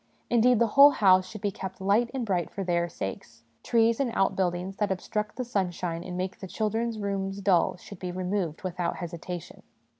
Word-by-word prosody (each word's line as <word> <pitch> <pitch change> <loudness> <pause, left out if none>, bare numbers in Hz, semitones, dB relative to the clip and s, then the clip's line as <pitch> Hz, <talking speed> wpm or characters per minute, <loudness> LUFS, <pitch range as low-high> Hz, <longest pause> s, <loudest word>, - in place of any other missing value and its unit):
Indeed, 240 +1 +5
the 235 - +4
whole 280 +1 +10
house 185 -8 +4
should 215 -3 -9
be 205 -1 0
kept 190 0 -7
light 205 +5 +2
and 260 -3 -3
bright 180 -6 0
for 195 - -5
their 170 -1 0
sakes; 115 - -7 0.2
trees 230 0 +2
and 265 -4 0
outbuildings 190 0 0
that 210 -2 0
obstruct 210 +3 -3
the 255 - -2
sunshine 180 -6 -2
and 180 0 -6
make 185 +1 -3
the 190 - -7
children's 220 +3 -1
rooms 195 -1 -3
dull 190 -3 +2
should 200 +1 -12
be 180 -1 -4
removed 180 -3 -2
without 180 -1 -2
hesitation. 175 0 -7
190 Hz, 185 wpm, -27 LUFS, 180-215 Hz, 0.2 s, whole